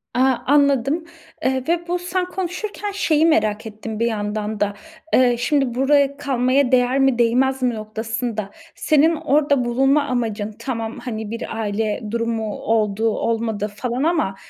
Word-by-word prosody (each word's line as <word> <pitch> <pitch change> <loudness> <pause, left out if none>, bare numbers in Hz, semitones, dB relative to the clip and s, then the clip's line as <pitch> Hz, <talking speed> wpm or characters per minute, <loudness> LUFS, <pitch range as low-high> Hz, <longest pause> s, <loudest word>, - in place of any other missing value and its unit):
A, - - +1 0.3
anladım, 280 +2 +3 0.4
eee, 260 0 +1
ve 340 +1 0
bu, 355 +1 -1
sen 360 +1 -1
konuşurken 380 +3 -4
şeyi 320 -6 +2
merak 215 -9 +2
ettim 220 0 -6
bir 230 - +2
yandan 210 -1 -3
da. 205 0 0 0.4
Eee, 250 -1 +5
şimdi, 270 -1 +1
buraya 280 +1 +3
kalmaya 265 -1 +1
değer 255 +1 +3
mi, 270 -3 +3
değmez 260 +3 +2
mi 250 -2 +1
noktasında, 220 0 -4 0.3
senin 310 +2 +3
orada 290 -4 +2
bulunma 270 +4 +3
amacın, 220 -5 -2
tamam, 230 -2 -4
hani, 220 -3 -5
bir 230 -1 -5
aile 215 0 -1
durumu 230 -2 -2
oldu, 220 0 0
olmadı 225 -1 -1
falan 250 +4 -2
ama 315 - +1
245 Hz, 145 wpm, -21 LUFS, 220-285 Hz, 0.4 s, Eee